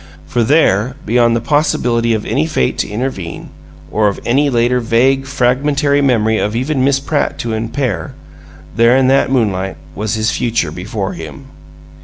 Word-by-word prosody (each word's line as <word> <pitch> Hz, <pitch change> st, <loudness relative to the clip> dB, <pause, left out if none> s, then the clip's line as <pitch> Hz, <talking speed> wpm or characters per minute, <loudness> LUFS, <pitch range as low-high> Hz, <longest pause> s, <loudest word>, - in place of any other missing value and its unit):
For 120 Hz, +6 st, 0 dB
there, 125 Hz, -3 st, +2 dB
beyond 120 Hz, +1 st, +3 dB
the 115 Hz, -, -1 dB
possibility 120 Hz, -5 st, +1 dB
of 105 Hz, -, -4 dB
any 80 Hz, -, 0 dB
fate 65 Hz, -5 st, -1 dB
to -, -, -1 dB
intervene, 105 Hz, -6 st, -5 dB, 0.4 s
or 105 Hz, 0 st, +2 dB
of 100 Hz, -, -2 dB
any 140 Hz, +4 st, +2 dB
later 120 Hz, 0 st, +2 dB
vague, 130 Hz, +4 st, +1 dB
fragmentary 140 Hz, +3 st, +1 dB
memory 110 Hz, -5 st, +2 dB
of 105 Hz, +2 st, -1 dB
even 130 Hz, +2 st, 0 dB
Miss 135 Hz, 0 st, +2 dB
Pratt 145 Hz, +2 st, -1 dB
to 115 Hz, -1 st, -3 dB
impair, 115 Hz, +2 st, -3 dB, 0.6 s
there 115 Hz, +2 st, +4 dB
in 130 Hz, -1 st, +3 dB
that 135 Hz, 0 st, +3 dB
moonlight 95 Hz, -7 st, 0 dB, 0.2 s
was 105 Hz, +1 st, -2 dB
his 110 Hz, 0 st, 0 dB
future 115 Hz, -9 st, -1 dB
before 95 Hz, +3 st, -4 dB
him. 80 Hz, -, -9 dB
120 Hz, 160 wpm, -15 LUFS, 110-135 Hz, 0.6 s, there